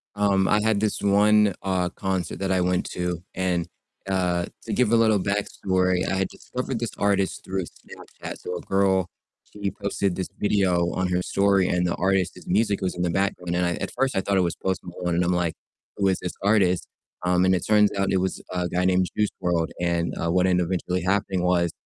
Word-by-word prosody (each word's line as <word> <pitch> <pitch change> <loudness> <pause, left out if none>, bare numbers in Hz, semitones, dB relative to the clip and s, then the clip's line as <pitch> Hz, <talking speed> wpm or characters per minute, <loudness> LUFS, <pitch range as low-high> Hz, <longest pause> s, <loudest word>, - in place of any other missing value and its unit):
Um, 100 -2 +2
I 105 - +3
had 110 -1 +2
this 105 0 -1
one, 105 0 +4
uh, 90 -2 0
concert 95 -1 -3
that 95 -1 -1
I 95 - +2
went 90 0 +1
to 90 -1 -3
and, 90 -2 0 0.4
uh, 90 -2 +1 0.2
to - - -4
give 125 -4 +2
a - - +5
little 110 -3 +4
backstory, 95 -2 0
I 95 - 0
had 95 0 0
discovered 125 -1 -5
this 120 -1 -3
artist 100 -2 0
through 95 -1 -3
Snapchat. - - -11
So 90 - -5
a - - -7
girl, 95 -2 +2 0.5
she 100 -1 -2
posted 100 -1 -2
this 95 - -4
video 90 -4 +2
on 95 0 0
her 90 0 +1
story 100 0 +2
and 90 0 +1
the 85 - 0
artist's 95 -2 0
music 100 +2 +1
was 95 -1 -1
in 90 - -4
the 90 - +1
background, 90 -1 -1
and 90 0 +1
I 85 - 0
at - - -4
first 135 0 +1
I 95 - +2
thought 100 0 0
it - - +4
was 85 -2 0
Post 95 -1 -2
Malone 90 -1 -3
and 90 - +2
I'm 90 +1 +1
like, 85 -2 0 0.4
who 100 - +2
is 95 -1 +1
this 90 - -4
artist? 100 -4 +2 0.4
Um, 90 0 +3
and 95 - +4
it 90 - -2
turns 105 -1 +5
out 95 0 +1
it 95 - +3
was 95 - -2
a 90 -1 -1
guy 90 +1 0
named 90 0 +3
Juice 105 -1 +2
WRLD, 85 -2 +1
and, 85 -1 0
uh, 85 - -1
what 90 +1 +3
ended 90 -1 +2
up - - -6
eventually 90 0 -1
happening 95 -1 0
was 85 -2 +2
95 Hz, 220 wpm, -24 LUFS, 90-100 Hz, 0.5 s, a